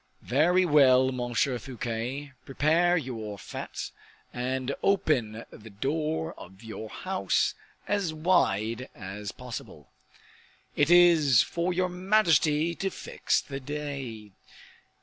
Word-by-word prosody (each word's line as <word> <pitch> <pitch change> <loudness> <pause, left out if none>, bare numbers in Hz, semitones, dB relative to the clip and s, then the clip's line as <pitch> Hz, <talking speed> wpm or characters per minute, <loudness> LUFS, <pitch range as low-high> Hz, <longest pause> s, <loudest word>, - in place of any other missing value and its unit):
"Very 175 +8 +3
well, 130 -4 +5
Monsieur 125 +1 -1
Fouquet, 125 +3 -5
prepare 165 +6 +2
your 115 -8 -5
fete, - - -7 0.4
and 130 +2 -2
open 130 - +1
the 110 +1 -12
door 140 - -2
of 95 +4 -13
your 110 -1 -7
house 190 - 0 0.3
as 200 -5 0
wide 130 - +1
as 100 +2 -7
possible." 125 -2 -9 0.8
"It 145 +1 +2
is 170 -8 +6
for 170 +2 -2
your 180 +1 0
majesty 170 -4 +2
to 195 +3 -2
fix - - -1
the 135 -1 -7
day." 135 -7 -6
140 Hz, 110 wpm, -28 LUFS, 115-170 Hz, 0.8 s, is